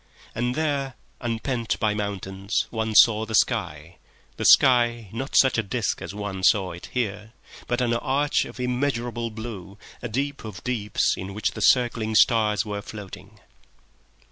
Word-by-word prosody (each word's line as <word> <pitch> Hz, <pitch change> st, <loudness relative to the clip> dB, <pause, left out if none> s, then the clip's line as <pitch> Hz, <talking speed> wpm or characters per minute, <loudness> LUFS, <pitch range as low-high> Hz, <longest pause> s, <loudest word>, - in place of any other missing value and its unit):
And 120 Hz, +2 st, -1 dB
there, 140 Hz, -4 st, -1 dB, 0.2 s
unpent 115 Hz, 0 st, -2 dB
by 110 Hz, -2 st, +1 dB
mountains, 100 Hz, -1 st, -3 dB
one 110 Hz, -1 st, -2 dB
saw 110 Hz, -1 st, +6 dB
the 110 Hz, 0 st, -3 dB
sky—the 75 Hz, -1 st, -3 dB
sky, 120 Hz, -4 st, +5 dB
not 130 Hz, +5 st, -5 dB
such 130 Hz, -3 st, +5 dB
a -, -, +3 dB
disc 110 Hz, +1 st, -2 dB
as -, -, -6 dB
one 105 Hz, -2 st, -5 dB
saw 95 Hz, -1 st, +3 dB
it 85 Hz, -, -9 dB
here, 110 Hz, -2 st, -3 dB, 0.3 s
but 120 Hz, +1 st, -1 dB
an 120 Hz, -1 st, +1 dB
arch 140 Hz, +5 st, +1 dB
of -, -, -11 dB
immeasurable 120 Hz, -2 st, -2 dB
blue, 110 Hz, -3 st, -8 dB, 0.2 s
a 120 Hz, -, -5 dB
deep 140 Hz, +5 st, -3 dB
of 105 Hz, -5 st, -9 dB
deeps 115 Hz, -5 st, 0 dB
in 95 Hz, +1 st, -7 dB
which 105 Hz, -, 0 dB
the 110 Hz, -, -8 dB
circling 115 Hz, -2 st, +2 dB
stars 110 Hz, -1 st, +3 dB
were 105 Hz, -1 st, -4 dB
floating 105 Hz, -2 st, -11 dB
115 Hz, 150 wpm, -24 LUFS, 105-125 Hz, 0.3 s, saw